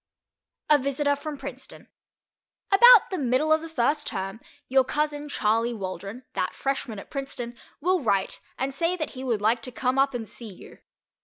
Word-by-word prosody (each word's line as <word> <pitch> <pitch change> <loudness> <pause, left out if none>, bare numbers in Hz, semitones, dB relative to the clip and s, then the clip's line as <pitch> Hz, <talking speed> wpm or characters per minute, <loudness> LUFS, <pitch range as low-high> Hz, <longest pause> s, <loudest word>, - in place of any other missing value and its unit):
A 300 -1 +5
VISITOR 280 +2 0
FROM 295 +1 -6
PRINCETON - - -9 0.8
About 475 +2 +8
the 375 - -2
middle 270 +4 +2
of 315 - +2
the 330 - -8
first 295 +1 0
term 195 +1 -4 0.3
your 265 0 +4
cousin 295 +2 -2
Charley 230 -1 +1
Waldron, 195 +4 -6
that 185 - -2
freshman 270 -5 -3
at 195 - -10
Princeton, 260 -4 -5 0.3
will 365 +3 +2
write 200 -6 0 0.2
and 270 +1 -2
say 335 +6 0
that 315 - -3
he 260 -1 -8
would 235 -5 -1
like 230 +2 +2
to 255 - -6
come 255 +2 0
up 275 -1 +2
and 225 -2 -4
see 230 +1 -9
you. 185 - -14
265 Hz, 175 wpm, -26 LUFS, 230-295 Hz, 0.8 s, About